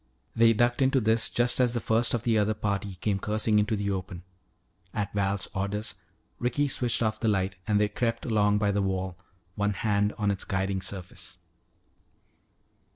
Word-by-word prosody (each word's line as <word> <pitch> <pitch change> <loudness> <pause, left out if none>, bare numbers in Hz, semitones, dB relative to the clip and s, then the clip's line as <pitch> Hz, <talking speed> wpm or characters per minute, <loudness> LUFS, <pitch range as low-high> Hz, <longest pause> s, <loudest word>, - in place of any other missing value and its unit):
They 115 0 +5
ducked 120 +4 +1
into 135 0 +4
this 110 0 +2
just 120 +1 +2
as 125 -1 +3
the - - +1
first 115 +2 +2
of 120 - -3
the 115 -2 +2
other 105 0 +2
party 100 -2 -2
came 100 +2 -1
cursing 105 +1 +1
into 105 +1 +1
the 100 -1 -1
open. 95 -2 -5 0.7
At 100 -2 -2
Val's 100 -1 0
orders, 100 +2 -2 0.5
Ricky 125 +4 +1
switched 120 -2 0
off 110 -1 -1
the 115 - -1
light 95 -2 0
and 105 -1 +3
they 105 - +3
crept 115 +3 -2
along 105 -3 +2
by 105 -1 +1
the 100 0 0
wall, 95 -2 -2 0.4
one 105 +1 0
hand 105 0 +1
on 105 -2 +1
its 100 - -3
guiding 95 0 -1
surface. 90 -1 -6
105 Hz, 175 wpm, -27 LUFS, 100-115 Hz, 0.7 s, They